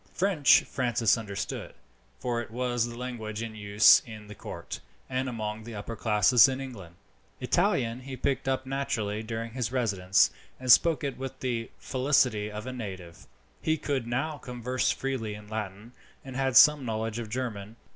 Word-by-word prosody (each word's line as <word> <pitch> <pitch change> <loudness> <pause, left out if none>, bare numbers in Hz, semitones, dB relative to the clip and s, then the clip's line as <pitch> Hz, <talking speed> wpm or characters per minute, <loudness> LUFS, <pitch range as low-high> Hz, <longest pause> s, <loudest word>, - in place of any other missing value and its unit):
French 180 -7 +4
Francis 120 -3 +1
understood, 105 -4 -5 0.4
for 120 -1 -1
it 115 - -8
was 120 0 -1
the 120 0 -8
language 115 -3 -5
in 115 -1 -6
use 105 0 +6
in 110 -2 -10
the 105 - -10
court - - -7 0.3
and 130 0 -2
among 110 -2 -4
the 115 0 -8
upper 105 +3 -6
classes 110 +2 +5
in 130 0 -3
England. 105 -11 -8 0.4
Italian 115 +1 +1
he 130 0 -8
picked 135 0 -1
up 130 0 0
naturally 130 -6 -2
during 115 +1 -5
his 125 -1 -3
residence, 100 -7 +2 0.3
and 130 -1 +2
spoke 165 +4 +5
it 140 -2 -3
with 135 0 -6
the 120 -3 -2
facility 125 -5 +1
of 105 +1 -7
a 130 - -5
native. 95 -8 -8 0.3
He 155 0 +1
could 140 -5 -2
now 145 +6 -2
converse 125 0 -2
freely 125 -6 -2
in 105 0 -12
Latin, 105 +1 -6 0.3
and 130 -1 -8
had 135 -1 +2
some 150 -2 +7
knowledge 110 -1 -3
of 115 -2 -6
German. 110 -3 -4
120 Hz, 165 wpm, -28 LUFS, 110-130 Hz, 0.4 s, some